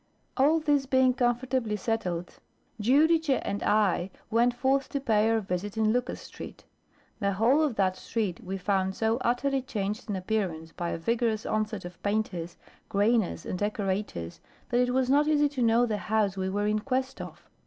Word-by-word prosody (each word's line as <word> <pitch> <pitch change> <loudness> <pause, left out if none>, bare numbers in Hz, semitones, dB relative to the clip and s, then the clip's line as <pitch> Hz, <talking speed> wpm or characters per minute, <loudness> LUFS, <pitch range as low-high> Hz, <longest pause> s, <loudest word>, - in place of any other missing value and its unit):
All 295 +4 +4
this 290 -3 +1
being 260 -1 +4
comfortably 245 -2 0
settled, 185 -5 -3 0.4
Giudice 295 +4 +3
and 200 0 -2
I 205 -3 +2 0.2
went 235 +2 +4
forth 270 +2 +1
to 280 - -2
pay 220 -4 +2
our 225 0 +2
visit 195 +2 -4
in 220 0 +3
Lucas 250 +1 -2
Street. - - -10 0.6
The 200 0 0
whole 235 +10 +3
of 295 -7 +1
that 190 -2 +1
street 205 -7 -3
we 190 +1 -4
found 190 0 0
so 225 +1 +1
utterly 260 +2 0
changed 210 -3 -4
in 205 - -1
appearance 185 -5 -2
by 175 0 -4
a - - -2
vigorous 225 +4 0
onset 215 -3 -2
of 175 0 -10
painters, 195 -5 -2 0.3
grainers, 205 -4 +1
and 180 - -4
decorators, 200 - -3 0.3
that 245 - +2
it 250 0 +2
was 260 0 +1
not 290 +3 +3
easy 295 -1 +4
to 275 -3 -4
know 235 +1 +4
the 215 -3 -1
house 205 0 0
we 190 -1 -2
were 205 +2 -1
in 210 0 +1
quest 260 +3 -2
of. - - -10
220 Hz, 175 wpm, -28 LUFS, 195-255 Hz, 0.6 s, All